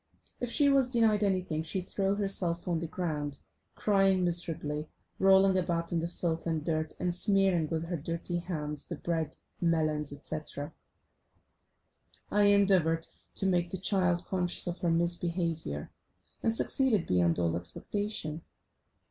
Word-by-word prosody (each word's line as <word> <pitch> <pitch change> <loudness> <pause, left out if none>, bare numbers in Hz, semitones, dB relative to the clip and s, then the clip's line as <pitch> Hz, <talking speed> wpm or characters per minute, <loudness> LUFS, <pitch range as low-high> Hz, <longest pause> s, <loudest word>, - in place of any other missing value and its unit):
If 245 - -2
she 285 +4 +4
was 275 -2 +3
denied 225 -4 +2
anything 185 -5 0
she 165 +4 -2
threw 195 +2 -1
herself 185 -4 0
on 170 -2 0
the 165 - -4
ground, 150 -4 -3 0.4
crying 195 -2 +2
miserably, 160 -3 +1 0.3
rolling 190 0 +5
about 170 -1 -2
in 170 - +1
the 165 - -2
filth 170 -1 -3
and 160 -2 -2
dirt, 155 -1 -1
and 180 -1 0
smearing 190 -4 +3
with 160 0 -2
her 170 +1 -3
dirty 165 +3 -3
hands 150 -4 -4
the - - -6
bread, 160 -3 -3 0.2
melons, 155 -3 +1
etc. 145 +1 -4 1.6
I 205 0 +4
endeavoured 190 -5 +3 0.3
to - - +2
make 175 -2 +1
the 190 - -4
child 180 -2 +1
conscious 180 -2 +1
of 175 0 -4
her 175 - 0
misbehaviour, 170 - -1 0.5
and 225 - +2
succeeded 225 -3 +1
beyond 85 -2 +2
all 85 -1 0
expectation. 155 - -3
175 Hz, 140 wpm, -30 LUFS, 160-195 Hz, 1.6 s, rolling